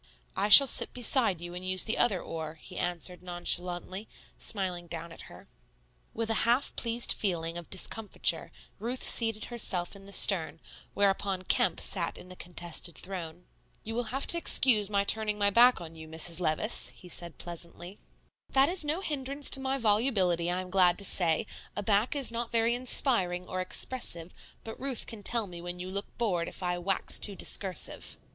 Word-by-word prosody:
"I 205 Hz, -, -1 dB
shall 275 Hz, +7 st, +10 dB
sit 265 Hz, -, -1 dB
beside 235 Hz, -7 st, +4 dB
you 175 Hz, 0 st, -8 dB
and 180 Hz, +1 st, -8 dB
use 185 Hz, 0 st, +3 dB
the 220 Hz, -, -3 dB
other 200 Hz, -6 st, +2 dB
oar," 160 Hz, -1 st, -7 dB
he 180 Hz, +3 st, -14 dB
answered 175 Hz, 0 st, -3 dB
nonchalantly, 180 Hz, +2 st, -3 dB, 0.3 s
smiling 180 Hz, -4 st, -3 dB
down 170 Hz, 0 st, -7 dB
at -, -, -13 dB
her. -, -, -15 dB, 0.6 s
With 225 Hz, 0 st, -4 dB
a 225 Hz, -, +1 dB
half 240 Hz, +4 st, 0 dB
pleased 235 Hz, 0 st, +1 dB
feeling 170 Hz, -4 st, -3 dB
of 175 Hz, -1 st, -8 dB
discomfiture 205 Hz, +3 st, -2 dB, 0.3 s
Ruth 240 Hz, +5 st, -4 dB
seated 225 Hz, -2 st, +3 dB
herself 185 Hz, -6 st, -1 dB
in 195 Hz, 0 st, -15 dB
the -, -, -13 dB
stern, 165 Hz, -6 st, +7 dB, 0.4 s
whereupon 195 Hz, -1 st, 0 dB
Kemp 180 Hz, -1 st, +1 dB
sat 175 Hz, -4 st, +1 dB
in 180 Hz, -, -14 dB
the 185 Hz, -, -11 dB
contested 175 Hz, -1 st, -2 dB
throne. 180 Hz, -2 st, -8 dB, 0.4 s
"You 225 Hz, -, -6 dB
will 240 Hz, +1 st, -3 dB
have 270 Hz, +5 st, -3 dB
to 340 Hz, -, +3 dB
excuse 220 Hz, -10 st, +5 dB
my 200 Hz, -1 st, 0 dB
turning 215 Hz, 0 st, 0 dB
my 205 Hz, -1 st, +1 dB
back 245 Hz, +4 st, +5 dB
on 165 Hz, -2 st, -10 dB
you, 160 Hz, 0 st, -11 dB
Mrs. 165 Hz, +2 st, -2 dB
Levice," 170 Hz, +6 st, +1 dB
he 180 Hz, -, -15 dB
said 170 Hz, -1 st, -6 dB
pleasantly. 175 Hz, +2 st, -8 dB, 0.5 s
"That 270 Hz, +2 st, +3 dB
is 360 Hz, -1 st, +4 dB
no 305 Hz, +5 st, -3 dB
hindrance 280 Hz, -3 st, 0 dB
to -, -, +3 dB
my 265 Hz, 0 st, -3 dB
volubility, 205 Hz, -7 st, 0 dB
I 180 Hz, +1 st, -2 dB
am 185 Hz, 0 st, -11 dB
glad 180 Hz, -2 st, +3 dB
to 200 Hz, -, +3 dB
say; 175 Hz, +2 st, +3 dB, 0.3 s
a 205 Hz, -, -4 dB
back 210 Hz, +6 st, 0 dB
is 275 Hz, -4 st, -1 dB
not 235 Hz, 0 st, -5 dB
very 230 Hz, 0 st, +1 dB
inspiring 235 Hz, -8 st, +1 dB
or 185 Hz, 0 st, -4 dB
expressive, 185 Hz, -3 st, -1 dB, 0.3 s
but 225 Hz, -, -10 dB
Ruth 265 Hz, -3 st, -2 dB
can 225 Hz, -3 st, -8 dB
tell 230 Hz, +2 st, +1 dB
me 175 Hz, -3 st, -10 dB
when 175 Hz, 0 st, -7 dB
you 185 Hz, +1 st, -7 dB
look 200 Hz, +1 st, -3 dB
bored 185 Hz, -8 st, -2 dB
if -, -, -8 dB
I 175 Hz, 0 st, -2 dB
wax 190 Hz, +2 st, -1 dB
too 205 Hz, -, -3 dB
discursive." 190 Hz, -2 st, -2 dB
195 Hz, 185 wpm, -28 LUFS, 175-230 Hz, 0.6 s, shall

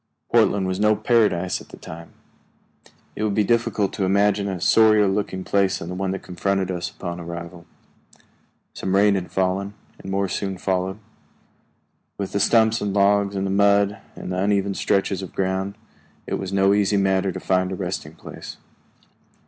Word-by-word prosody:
Portland 100 Hz, -2 st, +3 dB
was 95 Hz, 0 st, -2 dB
no 105 Hz, +1 st, +4 dB
paradise 105 Hz, -7 st, +1 dB
at -, -, -15 dB
that -, -, -12 dB
time. 85 Hz, +1 st, -10 dB, 1.0 s
It -, -, -5 dB
would 105 Hz, -2 st, 0 dB
be 105 Hz, -, +3 dB
difficult 115 Hz, -3 st, +1 dB
to 100 Hz, -, -2 dB
imagine 100 Hz, +1 st, +2 dB
a 95 Hz, -2 st, -3 dB
sorrier 110 Hz, +1 st, +5 dB
looking 95 Hz, -1 st, -2 dB
place 100 Hz, -1 st, +1 dB
than 85 Hz, -, -7 dB
the -, -, -4 dB
one 95 Hz, +1 st, -2 dB
that 95 Hz, 0 st, -4 dB
confronted 95 Hz, +1 st, -1 dB
us 90 Hz, -1 st, -3 dB
upon 85 Hz, -2 st, -6 dB
arrival. 85 Hz, 0 st, -8 dB, 1.1 s
Some 95 Hz, 0 st, -2 dB
rain 100 Hz, +1 st, +5 dB
had 95 Hz, -2 st, -3 dB
fallen, 95 Hz, +2 st, -1 dB, 0.2 s
and 95 Hz, -, -9 dB
more 100 Hz, 0 st, 0 dB
soon 95 Hz, +1 st, -3 dB
followed. 95 Hz, +1 st, -1 dB, 1.2 s
With 100 Hz, -2 st, -4 dB
the 100 Hz, -, -1 dB
stumps 110 Hz, +2 st, +3 dB
and 100 Hz, -1 st, -2 dB
logs 100 Hz, 0 st, +3 dB
and 95 Hz, 0 st, -1 dB
mud 100 Hz, 0 st, +3 dB, 0.2 s
and -, -, -7 dB
the 90 Hz, -, -2 dB
uneven 100 Hz, 0 st, +1 dB
stretches 95 Hz, 0 st, 0 dB
of 95 Hz, -, -9 dB
ground, 95 Hz, +1 st, -1 dB, 0.5 s
it -, -, -3 dB
was 95 Hz, -1 st, -5 dB
no 95 Hz, 0 st, +3 dB
easy 100 Hz, 0 st, +2 dB
matter 95 Hz, -1 st, +1 dB
to -, -, -6 dB
find 95 Hz, 0 st, 0 dB
a -, -, -2 dB
resting 90 Hz, -4 st, -5 dB
place. 80 Hz, -, -10 dB
95 Hz, 175 wpm, -23 LUFS, 95-100 Hz, 1.2 s, sorrier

